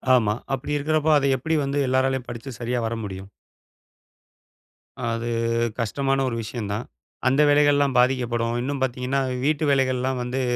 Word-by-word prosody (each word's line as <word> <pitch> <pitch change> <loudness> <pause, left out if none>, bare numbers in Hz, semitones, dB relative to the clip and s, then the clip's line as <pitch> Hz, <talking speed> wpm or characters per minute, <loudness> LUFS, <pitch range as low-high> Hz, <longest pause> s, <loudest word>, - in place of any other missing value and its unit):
ஆமா. 110 -4 +2 0.2
அப்பிடி 135 +2 -2
இருக்கிறப்ப 155 +1 +1
அத 140 - +1
எப்பிடி 160 +5 -1
வந்து 140 +1 -1
எல்லராலையும் 130 0 +1
படிச்சு 120 +3 -7
சரியா 120 +1 -1
வர 115 - -3
முடியும்? 95 -1 -7 1.8
அது 115 +1 -2 0.5
கஷ்டமான 135 +4 0
ஒரு 115 - -3
விஷயந்தான். 110 0 -4 0.4
அந்த 135 +3 +4
வேலைகள்லாம் 145 -2 +4
பாதிக்கப்படும். 120 -2 +1
இன்னும் 140 +2 -3
பார்த்தீங்கன்னா, 130 +1 0 0.2
வீட்டு 155 +1 +1
வேலைகள்லாம் 130 -1 +1
வந்து 125 +2 -2
130 Hz, 130 wpm, -24 LUFS, 120-140 Hz, 1.8 s, அந்த